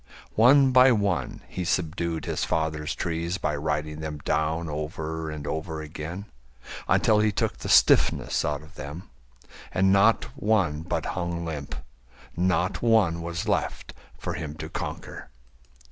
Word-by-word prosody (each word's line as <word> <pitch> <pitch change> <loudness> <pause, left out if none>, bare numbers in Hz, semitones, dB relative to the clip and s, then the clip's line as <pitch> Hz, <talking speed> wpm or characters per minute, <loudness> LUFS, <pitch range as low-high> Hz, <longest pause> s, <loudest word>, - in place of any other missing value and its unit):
One 130 +4 +6
by 130 +1 +7
one 100 - 0
he 90 - -4
subdued 85 -2 -1
his - - -2
father's 80 0 -1
trees 85 +1 -2
By 75 -5 -1
riding 75 +1 -2
them 80 -1 -5
down 80 +2 0
over 80 +1 -4
and 75 -1 -6
over 80 +1 -3
again 80 +5 -6 0.6
Until 110 -1 +4
he 105 0 +3
took 100 - -1
the - - -5
stiffness - - +4
out 75 0 -2
of 80 +3 -16
them, 75 +4 -8 0.6
And 95 +1 +3
not 105 +3 +5
one 100 - +1
but 85 - -2
hung 85 -1 -3
limp, 75 -3 -5 0.6
not 90 0 +1
one 105 -8 +3
was 85 +5 -4
left 100 - -1 0.2
For - - -4
him 75 0 -5
to - - -7
conquer. - - -6
85 Hz, 145 wpm, -26 LUFS, 75-95 Hz, 0.6 s, by